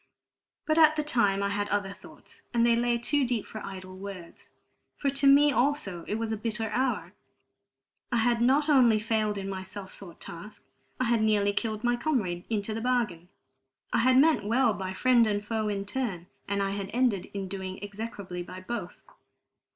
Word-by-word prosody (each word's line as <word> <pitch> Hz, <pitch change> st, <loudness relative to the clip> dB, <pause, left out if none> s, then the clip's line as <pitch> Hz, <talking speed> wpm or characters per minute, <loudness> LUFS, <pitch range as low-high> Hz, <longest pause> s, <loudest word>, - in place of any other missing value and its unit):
But 310 Hz, +1 st, +2 dB
at 310 Hz, -1 st, +7 dB
the 305 Hz, -, 0 dB
time 205 Hz, -9 st, +1 dB
I 200 Hz, -, 0 dB
had 205 Hz, 0 st, -2 dB
other 200 Hz, -1 st, -1 dB
thoughts, 200 Hz, -, -14 dB
and 235 Hz, 0 st, +4 dB
they 235 Hz, -1 st, +4 dB
lay 240 Hz, 0 st, +1 dB
too 280 Hz, +4 st, +1 dB
deep 245 Hz, -4 st, -1 dB
for 215 Hz, -, -8 dB
idle 185 Hz, -1 st, -8 dB
words, 185 Hz, -3 st, -10 dB, 0.5 s
for 275 Hz, -, 0 dB
to 275 Hz, 0 st, +2 dB
me 285 Hz, +1 st, +7 dB
also 245 Hz, -, 0 dB
it 210 Hz, -, -1 dB
was 225 Hz, 0 st, -2 dB
a 220 Hz, -, -1 dB
bitter 220 Hz, 0 st, -3 dB
hour. 260 Hz, 0 st, -1 dB, 1.0 s
I 240 Hz, -, +2 dB
had 235 Hz, 0 st, +2 dB
not 275 Hz, +5 st, +3 dB
only 250 Hz, -7 st, +5 dB
failed 215 Hz, -1 st, 0 dB
in 195 Hz, 0 st, -4 dB
my 190 Hz, -1 st, -4 dB
self 190 Hz, +1 st, -8 dB
sought 180 Hz, -4 st, -10 dB
task; 170 Hz, +6 st, -10 dB, 0.3 s
I -, -, +2 dB
had 235 Hz, -2 st, +2 dB
nearly 205 Hz, -2 st, +2 dB
killed 215 Hz, +1 st, -2 dB
my 240 Hz, 0 st, +2 dB
comrade 215 Hz, -, -1 dB
into 215 Hz, -1 st, -2 dB
the 225 Hz, -, -4 dB
bargain. 220 Hz, -9 st, -1 dB, 0.6 s
I -, -, +3 dB
had 255 Hz, +2 st, +4 dB
meant 305 Hz, -4 st, +5 dB
well 230 Hz, +2 st, +2 dB
by 190 Hz, -1 st, -4 dB
friend 240 Hz, 0 st, +4 dB
and 205 Hz, -1 st, -1 dB
foe 220 Hz, -1 st, -1 dB
in 200 Hz, -1 st, -2 dB
turn, 200 Hz, -6 st, -3 dB, 0.2 s
and 200 Hz, 0 st, 0 dB
I 195 Hz, -, -1 dB
had 200 Hz, -1 st, -4 dB
ended 240 Hz, -7 st, +1 dB
in 195 Hz, -1 st, -3 dB
doing 190 Hz, 0 st, -5 dB
execrably 200 Hz, -3 st, -6 dB
by 185 Hz, +1 st, -8 dB
both. 235 Hz, +5 st, -6 dB
215 Hz, 190 wpm, -28 LUFS, 195-245 Hz, 1.0 s, at